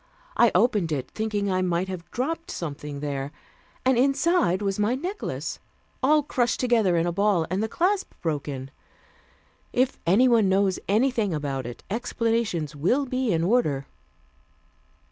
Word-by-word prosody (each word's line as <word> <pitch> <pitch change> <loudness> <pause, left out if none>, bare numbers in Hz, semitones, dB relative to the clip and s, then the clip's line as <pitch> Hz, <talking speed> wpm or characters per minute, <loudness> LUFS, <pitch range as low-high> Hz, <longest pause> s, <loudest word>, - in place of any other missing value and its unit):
I 235 - +5
opened 205 -4 +2
it, 135 -4 -3
thinking 210 -2 -1
I 185 0 +1
might 180 0 0
have 185 -3 -7
dropped 325 +7 -3
something 145 -3 -5
there, 140 -1 -3 0.5
and 260 -2 +4
inside 275 - +2
was 195 0 -1
my 210 +4 +2
necklace, 365 +10 -4 0.4
all 300 +3 +4
crushed 245 -4 0
together 225 -8 +3
into 170 +1 +1
a - - -3
ball, 200 -3 +2
and 190 +2 0
the 220 - -1
clasp 380 - 0
broken. 140 -4 -3 1.0
If 255 +1 +1
anyone 225 +2 +5
knows 190 0 +2
anything 220 -3 +2
about 135 -4 -3
it, 120 - -9
explanations 225 - -1
will 240 - +1
be 255 -2 -1
in 165 -1 +1
order." 170 - +1
200 Hz, 145 wpm, -25 LUFS, 165-245 Hz, 1.0 s, I